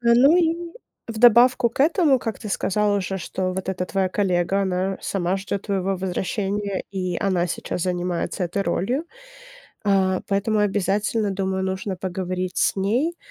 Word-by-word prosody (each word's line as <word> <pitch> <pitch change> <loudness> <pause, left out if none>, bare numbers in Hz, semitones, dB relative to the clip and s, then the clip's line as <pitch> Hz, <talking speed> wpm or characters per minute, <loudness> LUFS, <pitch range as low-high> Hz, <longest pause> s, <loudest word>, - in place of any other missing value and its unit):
Ну 245 +7 +5
и 335 -2 +2 0.5
в 225 -1 -5
добавку 240 +1 +6
к 235 - -6
этому, 310 -2 +4
как 225 -3 -4
ты 215 - -7
сказала 205 +1 +1
уже, 195 0 -3
что 185 +1 -3
вот 190 0 -5
эта 185 -1 -1
твоя 190 -1 0
коллега, 185 0 +1
она 190 0 -1
сама 185 -1 -1
ждёт 200 0 -4
твоего 195 -1 -1
возвращения, 195 +2 -2
и 185 -2 -2
она 185 -3 +1
сейчас 170 0 -4
занимается 180 +1 -2
этой 180 +3 -2
ролью. 220 - -1 0.8
А, 190 -2 +2
поэтому 205 +2 +1
обязательно, 205 +1 0
думаю, 190 0 -1
нужно 190 +1 -3
поговорить 185 0 -3
с - - +2
ней, 240 - 0
195 Hz, 155 wpm, -23 LUFS, 185-215 Hz, 0.8 s, добавку